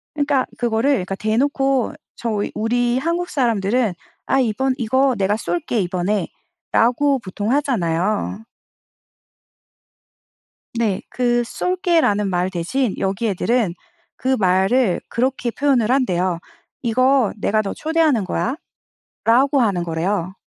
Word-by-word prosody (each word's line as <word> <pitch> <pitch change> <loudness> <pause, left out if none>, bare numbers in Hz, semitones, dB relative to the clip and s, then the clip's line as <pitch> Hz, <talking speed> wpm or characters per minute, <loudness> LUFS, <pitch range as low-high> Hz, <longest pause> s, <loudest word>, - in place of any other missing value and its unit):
그러니까 285 -3 +1
그거를 235 +2 +1
그러니까 195 -6 -1
대놓고 265 +5 0 0.2
저희 215 -3 -2
우리 240 +3 +1
한국 340 +4 -1
사람들은 230 -5 +1 0.3
"아 270 - +2
이번 255 +2 0
이거 260 +3 +2
내가 200 +2 +1
쏠게 265 -4 -2
이번에."라고 215 +8 0
보통 205 +2 -4
하잖아요. 210 - 0 2.3
네 210 -5 0
그 240 -1 +1
"쏠게."라는 325 - +1
말 180 0 0
대신 195 +7 -1
여기 195 +4 -1
애들은 210 -1 0 0.4
그 260 0 0
말을 190 +3 +2
그렇게 250 0 -1
표현을 250 -3 +1
한대요. 185 -10 +1 0.4
"이거 255 0 +3
내가 215 +1 +1
너 195 - -4
초대하는 310 - +1 0.8
거야."라고 265 +4 +2
하는 195 -7 +1
거래요. 175 +3 -2
235 Hz, 260 characters per minute, -20 LUFS, 195-265 Hz, 2.3 s, 이거